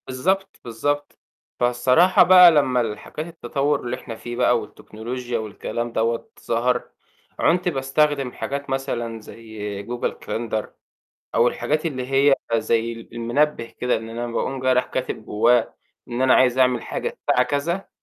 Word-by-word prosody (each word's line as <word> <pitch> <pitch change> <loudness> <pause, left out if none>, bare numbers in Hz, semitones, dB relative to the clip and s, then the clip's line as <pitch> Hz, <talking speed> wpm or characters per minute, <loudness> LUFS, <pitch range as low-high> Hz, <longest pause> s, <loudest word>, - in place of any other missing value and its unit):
بالضبط، 190 +10 -1
بالضبط. 145 +6 -3 0.4
فالصراحة 125 +9 +4
بقى 180 -1 +9
لمّا 130 -5 +3
الحاجات 115 +8 -5
التطوّر 145 -2 -1
اللي 120 0 -3
إحنا 120 -2 -8
فيه 120 +2 -7
بقى 120 -1 +3
والتكنولوجيا 120 +3 -6
والكلام 115 +2 -4
دوَّة 115 +1 -1 0.2
ظَهَر، 120 +2 +1 0.6
عُنت 180 +2 +2
باستخدم 135 -2 +1
حاجات 140 +2 -5
مثلًا 120 -4 -3
زي 105 -2 -7
google 120 0 -2
calendar 110 -2 -2 0.7
أو 115 +2 +4
الحاجات 155 +6 -1
اللي 130 -5 -3
هي 135 +1 +5 0.2
زي 115 0 +1
ال 115 0 -12
المنبه 120 +4 0
كده، 125 +2 -2
إن 110 0 -7
أنا 120 +1 -4
باقوم 130 +3 -3
جاي 130 0 +2
رايح 125 0 +2
كاتب 125 -4 -4
جواه 115 +2 +2 0.3
إن 120 +2 -2
أنا 130 -1 +5
عايز 130 0 +4
أعمل 125 -2 +3
حاجة - - -3
الساعة 125 - +2
كذا، 170 +8 -2
125 Hz, 145 wpm, -22 LUFS, 115-140 Hz, 0.7 s, بقى